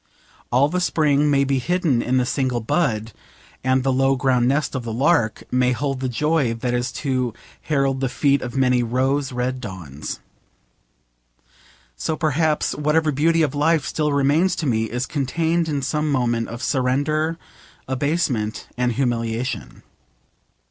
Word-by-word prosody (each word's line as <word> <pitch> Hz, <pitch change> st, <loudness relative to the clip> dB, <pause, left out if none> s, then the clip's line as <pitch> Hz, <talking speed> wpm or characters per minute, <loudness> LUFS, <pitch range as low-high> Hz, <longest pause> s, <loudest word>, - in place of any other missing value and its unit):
All 130 Hz, +4 st, +4 dB
the 180 Hz, +4 st, -1 dB
spring 150 Hz, -4 st, +2 dB
may 140 Hz, -1 st, +3 dB
be 135 Hz, -1 st, +1 dB
hidden 165 Hz, -5 st, +1 dB
in 125 Hz, +2 st, 0 dB
the 125 Hz, -, +2 dB
single 130 Hz, -2 st, 0 dB
bud, 115 Hz, -4 st, 0 dB, 0.5 s
and 130 Hz, 0 st, +2 dB
the 135 Hz, 0 st, +1 dB
low 135 Hz, +1 st, +3 dB
ground 125 Hz, -2 st, +2 dB
nest 145 Hz, +3 st, 0 dB
of 130 Hz, -3 st, -3 dB
the 115 Hz, -, -4 dB
lark 115 Hz, -2 st, +1 dB
may 125 Hz, 0 st, +2 dB
hold 135 Hz, +1 st, -2 dB
the 130 Hz, -1 st, -2 dB
joy 145 Hz, -1 st, +1 dB
that 120 Hz, +2 st, -2 dB
is 125 Hz, +1 st, -1 dB
to 130 Hz, -4 st, 0 dB, 0.3 s
herald 135 Hz, -3 st, 0 dB
the 135 Hz, -1 st, 0 dB
feet 140 Hz, +1 st, +2 dB
of 125 Hz, +1 st, -5 dB
many 125 Hz, -2 st, +3 dB
rose 130 Hz, +4 st, 0 dB
red 125 Hz, +1 st, -2 dB
dawns. 85 Hz, -, -7 dB, 1.8 s
So 160 Hz, -, -2 dB
perhaps 155 Hz, 0 st, +1 dB
whatever 150 Hz, +1 st, +1 dB
beauty 165 Hz, +4 st, +2 dB
of 145 Hz, -, 0 dB
life 150 Hz, 0 st, +2 dB
still 150 Hz, -1 st, -1 dB
remains 145 Hz, +6 st, +2 dB
to 165 Hz, -, -3 dB
me 110 Hz, -4 st, +1 dB
is 120 Hz, +3 st, -3 dB
contained 160 Hz, +5 st, 0 dB
in 145 Hz, -3 st, -1 dB
some 150 Hz, +2 st, 0 dB
moment 120 Hz, -4 st, 0 dB
of 120 Hz, +3 st, -7 dB
surrender, 145 Hz, +5 st, 0 dB, 0.5 s
abasement, 130 Hz, -5 st, -1 dB
and 125 Hz, -1 st, 0 dB
humiliation. 120 Hz, -1 st, -2 dB
135 Hz, 155 wpm, -22 LUFS, 125-150 Hz, 1.8 s, All